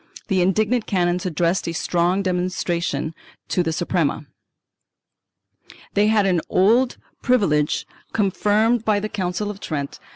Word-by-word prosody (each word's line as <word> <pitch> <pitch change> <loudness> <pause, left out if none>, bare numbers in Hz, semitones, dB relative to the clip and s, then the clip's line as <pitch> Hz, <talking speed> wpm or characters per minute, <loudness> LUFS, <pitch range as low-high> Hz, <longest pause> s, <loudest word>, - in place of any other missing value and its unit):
The 190 -2 +2
indignant 215 +5 +1
canons 180 -2 0
addressed 170 +2 0
a 165 - -2
strong 175 +3 +1
remon 180 -1 0
strance 170 -4 -2 0.4
to 180 - +1
the 165 -2 -1
Suprema. 160 -2 -1 1.7
They 205 +1 +3
had 215 -2 +3
an 180 -3 +2
old 235 +7 +3 0.2
privilege, 170 -12 +2 0.3
confirmed 215 +3 +2
by 210 -2 +2
the 215 +1 -4
Council 200 +1 -2
of 200 - -11
Trent 145 -7 -4
(Sess. - - -24
185 Hz, 135 wpm, -22 LUFS, 170-210 Hz, 1.7 s, They